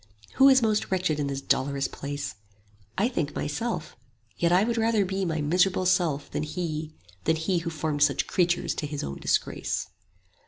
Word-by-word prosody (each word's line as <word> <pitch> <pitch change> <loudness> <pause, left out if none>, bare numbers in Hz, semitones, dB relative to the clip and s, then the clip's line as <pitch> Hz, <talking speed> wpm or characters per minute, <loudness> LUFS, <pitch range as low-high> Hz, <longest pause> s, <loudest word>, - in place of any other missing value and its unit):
20 - - -21
"Who 270 +1 +8
is 265 -1 +6
most 215 -1 +1
wretched 185 -5 0
in 145 - 0
this 140 -1 -3
dolorous 140 0 0
place? 145 0 -5 0.6
I 210 - +3
think 155 - -2
myself; 225 +11 -3 0.4
yet 170 0 +1
I 180 +3 +5
would 235 +1 0
rather 225 -2 +2
be 190 +1 -2
My 160 -3 -1
miserable 180 +5 +2
self 165 -6 +1
than - - -2
He, 155 0 -4 0.3
than 160 - +3
He 165 +3 0
Who 165 - -4
formed 155 -2 -2
such 145 -1 +3
creatures 175 -2 +1
to 150 - -3
His 145 -1 -4
own 70 0 -5
disgrace. - - -1
165 Hz, 185 wpm, -27 LUFS, 150-190 Hz, 0.6 s, Who